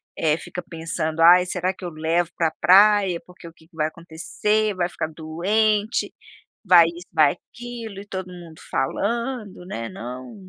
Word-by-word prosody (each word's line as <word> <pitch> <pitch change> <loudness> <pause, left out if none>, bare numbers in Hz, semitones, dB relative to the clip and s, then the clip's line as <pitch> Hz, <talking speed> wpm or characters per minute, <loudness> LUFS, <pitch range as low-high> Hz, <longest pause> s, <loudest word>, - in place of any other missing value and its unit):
eh, 155 0 +1
fica 180 - -7
pensando: 165 -2 -4
"Ai, 180 +2 +8
será 180 +1 -1
que 190 - -15
eu 175 - -3
levo 165 +2 0
pra 165 -2 +1
praia? 195 -1 +5
Porque 180 -1 -14
o 165 - -12
que 160 - -23
que 170 - -25
vai 155 -1 0
acontecer? 185 +6 -2
Vai 175 -1 0
ficar 155 - -4
doente! 205 +8 0 0.5
Vai 175 -3 +7
isso, 170 +1 -8
vai 150 -1 +4
aquilo" 235 -1 -9
e 200 - -11
todo 190 -2 -6
mundo 170 -3 -12
falando, 210 - -2
né: 115 -10 -5
"Não, 125 +1 -8
175 Hz, 165 wpm, -23 LUFS, 160-200 Hz, 0.5 s, Ai